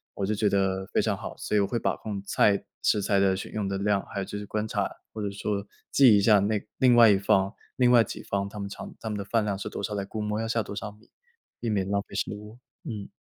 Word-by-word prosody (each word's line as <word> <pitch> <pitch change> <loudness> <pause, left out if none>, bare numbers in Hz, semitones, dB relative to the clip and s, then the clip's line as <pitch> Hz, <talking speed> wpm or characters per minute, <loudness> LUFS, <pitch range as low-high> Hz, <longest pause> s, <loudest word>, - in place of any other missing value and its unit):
我 100 - -1
就 105 - 0
觉 105 -1 +2
得 95 -1 0
非 - - +1
常 - - 0
好。 - - -7
所 - - -2
以 - - +5
我 100 - +2
会 120 - -1
把 - - 0
控 100 -3 -5
菜 100 0 +3 0.2
食 105 - +2
材 100 0 +2
的 95 -1 +3
选 95 - -6
用 105 -2 -2
的 95 - -2
量， 100 0 +1
还 100 - -5
有 95 - -2
就 105 - -6
是 105 - -6
观 105 +1 -2
察， - - -1 0.2
或 110 - -5
者 100 - -1
说 100 0 -3 0.3
记 130 -6 +7
一 100 - +3
下 105 0 +6
那 105 +1 0 0.2
另 125 -2 +5
外 115 -2 +8
一 100 - +5
方 95 0 +2 0.2
另 125 -1 +4
外 120 -2 +7
几 - - -7
方 100 0 -2
他 105 - -10
们 100 0 -4
常 - - -8
他 110 - -4
们 105 - -3
的 100 - -4
饭 110 +2 +1
量 100 -2 -1
是 - - -4
多 - - -6
少， 105 - -2
来 100 -1 -2
估 110 +2 -5
摸 105 0 -2
要 115 - -2
下 115 -1 0
多 100 - -8
少 105 0 -5
米， 105 +3 -22 0.5
避 115 - -2
免 100 -2 0
浪 100 0 +1
费 - - -11
食 - - -1
物。 105 +2 -10 0.3
嗯。 105 -7 -6
105 Hz, 310 characters per minute, -27 LUFS, 100-110 Hz, 0.5 s, 外